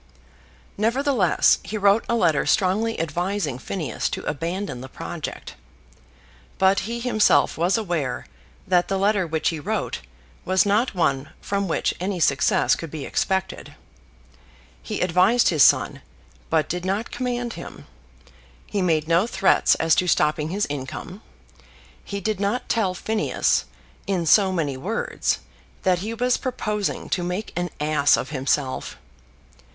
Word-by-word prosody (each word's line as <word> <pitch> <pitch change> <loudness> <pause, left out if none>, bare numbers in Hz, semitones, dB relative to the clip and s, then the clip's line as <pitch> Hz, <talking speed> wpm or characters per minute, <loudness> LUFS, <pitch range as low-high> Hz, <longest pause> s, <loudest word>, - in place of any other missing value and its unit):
Nevertheless 235 - +3
he 215 - -4
wrote 200 +2 +3
a 235 - +2
letter 165 -10 +2
strongly 220 +3 +1
advising 165 -3 -2
Phineas 155 - -3
to - - -5
abandon 165 -2 -3
the 130 - -9
project. - - -7 1.0
But 190 +1 +4
he 235 0 -3
himself 215 - +3
was 175 +6 +2
aware 170 - -2 0.4
that 180 -2 +2
the 195 - -1
letter 195 -2 +2
which 160 -1 0
he 165 - -4
wrote 145 - -2 0.4
was 185 0 +2
not 210 +3 +1
one 140 -5 0
from 200 -1 -2
which 165 - 0
any 185 0 -2
success 140 -4 +3
could 165 - -7
be 150 -2 -6
expected. 190 -1 -2 1.1
He - - -4
advised 185 +7 +4
his 155 -4 +1
son, - - +4 0.5
but 160 -2 +2
did 175 +1 -3
not 195 +5 -2
command 245 -2 -3
him. 170 - -10 0.8
He 200 - -2
made 160 -4 +1
no 170 +6 +3
threats 195 -5 +3
as 165 0 +2
to 180 - +2
stopping 150 -1 +1
his 200 +4 0
income. 145 +8 -6 0.8
He 200 - -5
did 215 0 -2
not 205 +5 -1
tell 195 -6 +1
Phineas, 215 +3 0 0.4
in 185 -4 0
so 190 +4 +5
many 150 -7 -1
words, 205 +12 -2 0.4
that 180 -2 +2
he 220 +5 -4
was 250 +1 +1
proposing 210 -6 -3
to 185 - 0
make 180 +4 -4
an 175 0 -2
ass 150 -1 +3
of - - -4
himself. 135 -1 -1
185 Hz, 140 wpm, -23 LUFS, 160-210 Hz, 1.1 s, so